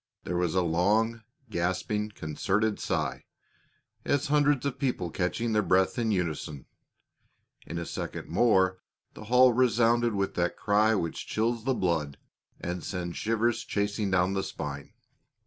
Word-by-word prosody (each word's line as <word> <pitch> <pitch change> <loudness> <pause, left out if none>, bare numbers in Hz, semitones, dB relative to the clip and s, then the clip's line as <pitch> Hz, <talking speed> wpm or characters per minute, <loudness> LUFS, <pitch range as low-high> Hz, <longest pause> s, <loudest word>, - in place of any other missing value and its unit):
There 90 - -3
was 90 -1 0
a 90 - +3
long, 105 +8 +1 0.3
gasping, 95 +4 -1
concerted 105 +4 -1
sigh, - - -2 0.8
as 140 -1 +1
of - - -2
hundreds 145 -2 +3
of 140 -1 -2
people 125 - -1
catching 110 +7 -1
their 105 - +3
breath 95 +2 +2
in 115 -2 0
unison; 80 -7 -2 1.0
in 85 - -5
a 85 - -3
second - - -5
more 95 -1 +3 0.3
the 110 - -10
hall 125 +2 +6
resounded 120 -2 +3
with 100 -1 -1
that 90 -1 -1
cry 110 +1 +3
which 85 -5 -3
chills 115 +1 -1
the 135 -1 +1
blood 80 - -1 0.4
and 90 0 -4
sends 90 -3 -4
shivers 115 +1 0
chasing 100 0 -1
down 95 0 +2
the 95 - 0
spine. 75 0 -6
100 Hz, 145 wpm, -28 LUFS, 90-115 Hz, 1.0 s, hall